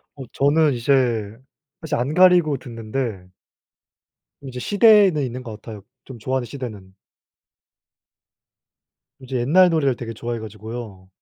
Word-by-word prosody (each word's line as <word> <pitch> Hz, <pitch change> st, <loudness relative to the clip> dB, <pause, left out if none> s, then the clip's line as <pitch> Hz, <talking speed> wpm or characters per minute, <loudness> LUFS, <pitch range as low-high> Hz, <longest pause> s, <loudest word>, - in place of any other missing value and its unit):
어 135 Hz, -, -8 dB
저는 145 Hz, +1 st, +2 dB
이제 120 Hz, +3 st, -2 dB, 0.9 s
사실 160 Hz, -2 st, -3 dB
안 135 Hz, +3 st, -2 dB
가리고 180 Hz, -4 st, +4 dB
듣는데 115 Hz, -5 st, -6 dB, 1.1 s
이제 130 Hz, -2 st, -7 dB
시대는 205 Hz, -, +4 dB
있는 125 Hz, 0 st, -5 dB
것 110 Hz, -3 st, -9 dB
같아요. 105 Hz, -4 st, -10 dB, 0.2 s
좀 130 Hz, -3 st, -10 dB
좋아하는 130 Hz, +3 st, -2 dB
시대는. 110 Hz, -7 st, -8 dB, 2.3 s
이제 130 Hz, -1 st, -5 dB
옛날 175 Hz, +9 st, +4 dB
노래를 145 Hz, -6 st, +1 dB
되게 115 Hz, -1 st, -7 dB
좋아해 120 Hz, +1 st, -5 dB
가지고요. 110 Hz, -2 st, -9 dB
125 Hz, 260 characters per minute, -21 LUFS, 115-150 Hz, 2.3 s, 가리고